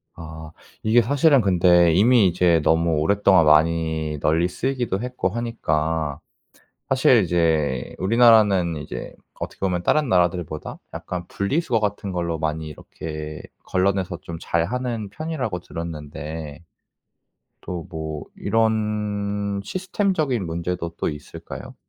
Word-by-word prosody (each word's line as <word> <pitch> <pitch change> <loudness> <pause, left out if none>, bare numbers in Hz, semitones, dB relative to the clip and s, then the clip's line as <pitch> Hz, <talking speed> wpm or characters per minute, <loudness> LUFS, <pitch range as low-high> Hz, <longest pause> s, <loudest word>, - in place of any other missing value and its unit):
아. 80 -1 -9 0.3
이게 115 +2 +5
사실은 140 +2 +4
근데 85 -3 +4
이미 110 +2 +5
이제 85 -2 +3
너무 80 0 +2
오랫동안 95 0 +4
많이 80 -1 +2
널리 80 +4 +2
쓰이기도 120 0 -2
했고 125 -6 -2
하니까 80 -10 -2 0.7
사실 130 -4 +4
이제 80 -7 0
우리나라는 105 -6 +4
이제 75 - -7 0.3
어떻게 - - -6
보면 90 -2 -1
다른 150 - +2
나라들보다 90 -4 0
약간 90 -1 -5
분리수거 120 +3 0
같은 105 -2 -2
걸로 85 -2 -2
많이 80 0 -2
이렇게 75 0 -7 0.2
걸러내서 95 -1 0
좀 85 -1 -7
잘하는 115 +4 -2
편이라고 130 - -4
들었는데 80 -2 -7 1.0
또 90 0 -6
뭐 80 -2 -5
이런 105 -2 -1
시스템적인 175 - -1
문제도 85 +1 -3
또 - - -1
있을까요? 75 0 -9
90 Hz, 280 characters per minute, -23 LUFS, 80-110 Hz, 1.0 s, 이게